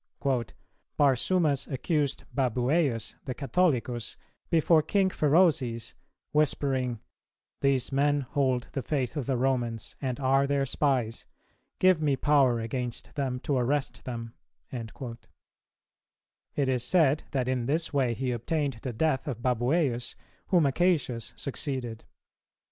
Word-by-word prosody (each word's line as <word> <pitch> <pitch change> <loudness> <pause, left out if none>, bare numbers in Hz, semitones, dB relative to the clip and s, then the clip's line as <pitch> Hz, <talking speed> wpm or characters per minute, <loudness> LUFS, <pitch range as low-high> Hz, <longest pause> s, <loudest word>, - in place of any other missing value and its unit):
"Barsumas 145 +2 +2
accused 145 +1 0
Babuæus, 130 0 +1
the 130 -3 -4
Catholicus, 130 -6 0 0.3
before 160 0 +4
King 190 +3 +1
Pherozes, 150 -8 +2 0.4
whispering, 135 -5 +1 0.6
'These 135 -2 +1
men 145 +1 +2
hold 130 -2 0
the 135 - -2
faith 135 -1 -2
of 145 -5 -3
the 135 -2 +1
Romans, 120 -3 -1
and 130 -1 -2
are 135 +1 +3
their 140 -1 +1
spies. 130 -5 0 0.5
Give 185 -3 +4
me 145 -3 +2
power 135 -4 +3
against 120 +1 -4
them 130 -4 -2
to 145 - 0
arrest 130 0 -1
them.'"[294:1] 115 0 -8 1.4
It 140 -2 +1
is 125 -2 +1
said 155 0 +3
that 130 -3 -1
in 125 -2 -1
this 160 +3 0
way 130 -4 +2
he 130 +2 -1
obtained 135 +1 -1
the 130 - -4
death 150 +4 0
of 120 -4 -4
Babuæus, 125 +1 +1 0.3
whom 180 -3 +4
Acacius 135 -7 +1
succeeded. 130 -5 -4
135 Hz, 120 wpm, -28 LUFS, 125-145 Hz, 1.4 s, before